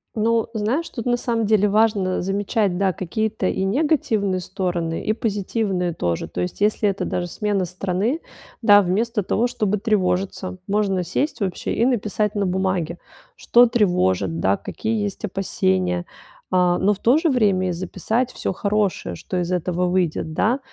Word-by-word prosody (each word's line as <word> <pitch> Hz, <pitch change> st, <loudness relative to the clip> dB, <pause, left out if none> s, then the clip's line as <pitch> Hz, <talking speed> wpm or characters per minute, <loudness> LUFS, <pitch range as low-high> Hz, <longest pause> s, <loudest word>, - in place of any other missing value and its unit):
Ну, 225 Hz, +1 st, +1 dB
знаешь, 235 Hz, +10 st, -1 dB
тут 230 Hz, -, -6 dB
на 245 Hz, -1 st, +2 dB
самом 235 Hz, -2 st, -1 dB
деле 210 Hz, -1 st, +3 dB
важно 205 Hz, -3 st, +2 dB
замечать, 195 Hz, 0 st, 0 dB
да, 195 Hz, 0 st, +2 dB
какие-то 200 Hz, +4 st, -2 dB
и 190 Hz, -, -1 dB
негативные 215 Hz, -, +1 dB
стороны, 175 Hz, -3 st, -2 dB
и 215 Hz, -, +2 dB
позитивные 200 Hz, -4 st, -1 dB
тоже. 85 Hz, -, -2 dB
То 85 Hz, +2 st, -4 dB
есть 90 Hz, -, -4 dB
если 210 Hz, 0 st, +2 dB
это 195 Hz, -, -2 dB
даже 175 Hz, 0 st, -2 dB
смена 205 Hz, +1 st, -1 dB
страны, 185 Hz, -, -1 dB, 0.4 s
да, 205 Hz, -2 st, +7 dB
вместо 210 Hz, +4 st, 0 dB
того, 230 Hz, +6 st, +1 dB
чтобы 210 Hz, -3 st, -1 dB
тревожиться, 190 Hz, -3 st, -1 dB
можно 200 Hz, -2 st, +1 dB
сесть, 220 Hz, -, -2 dB
вообще, 190 Hz, -4 st, -2 dB
и 230 Hz, -, +2 dB
написать 215 Hz, -4 st, 0 dB
на 205 Hz, -1 st, +1 dB
бумаге: 185 Hz, -2 st, -1 dB, 0.4 s
что 245 Hz, -, +5 dB
тревожит, 100 Hz, -, +1 dB
да, 95 Hz, +2 st, +2 dB
какие 220 Hz, -1 st, -3 dB
есть 205 Hz, 0 st, -4 dB
опасения. 95 Hz, -, 0 dB, 0.5 s
А, 180 Hz, -1 st, +3 dB
но 200 Hz, +3 st, +3 dB
в 200 Hz, -, -9 dB
то 245 Hz, +7 st, +4 dB
же 325 Hz, +1 st, +2 dB
время 200 Hz, -8 st, +2 dB
и -, -, 0 dB
записать 190 Hz, +8 st, -2 dB
всё -, -, -2 dB
хорошее, 200 Hz, +1 st, -1 dB
что 185 Hz, -, -5 dB
из 175 Hz, -1 st, -2 dB
этого 180 Hz, 0 st, 0 dB
выйдет, 175 Hz, -3 st, 0 dB
да. 230 Hz, -, +1 dB
195 Hz, 160 wpm, -22 LUFS, 180-220 Hz, 0.5 s, да